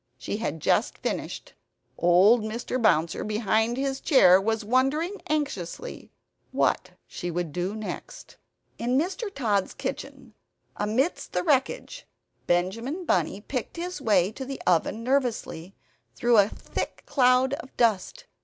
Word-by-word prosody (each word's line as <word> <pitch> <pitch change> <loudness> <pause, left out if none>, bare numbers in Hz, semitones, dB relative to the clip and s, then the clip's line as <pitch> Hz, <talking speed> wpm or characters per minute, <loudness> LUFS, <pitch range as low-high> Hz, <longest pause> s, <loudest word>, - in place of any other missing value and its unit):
She - - -4
had 185 -8 -3
just - - +1
finished. - - -4 0.4
Old 185 +7 +5
Mr. 235 +3 -3
Bouncer, 170 -7 +2
behind 220 +2 +1
his 270 0 -2
chair, 190 - +6
was 220 +1 -1
wondering 275 - +1
anxiously 285 - -3 0.4
what - - +1 0.2
she 175 - -6
would 170 -3 -3
do 180 +4 -2
next. 215 -1 -7 0.4
In 245 +2 +1
Mr. 380 - -1
Tod's 210 - 0
kitchen, 270 -4 -6 0.4
amidst 230 +11 -1
the - - 0
wreckage, 305 - 0 0.4
Benjamin 230 - -1
Bunny 205 -9 0
picked 255 +7 -5
his 350 -2 -4
way 200 -6 +3
to 265 - -7
the 270 0 -6
oven 180 +6 +1
nervously, 235 -9 -1 0.4
through 240 -2 +4
a 200 +1 +4
thick - - -5
cloud 255 0 +3
of 270 -2 -7
dust. 235 - +1
235 Hz, 130 wpm, -26 LUFS, 200-275 Hz, 0.4 s, chair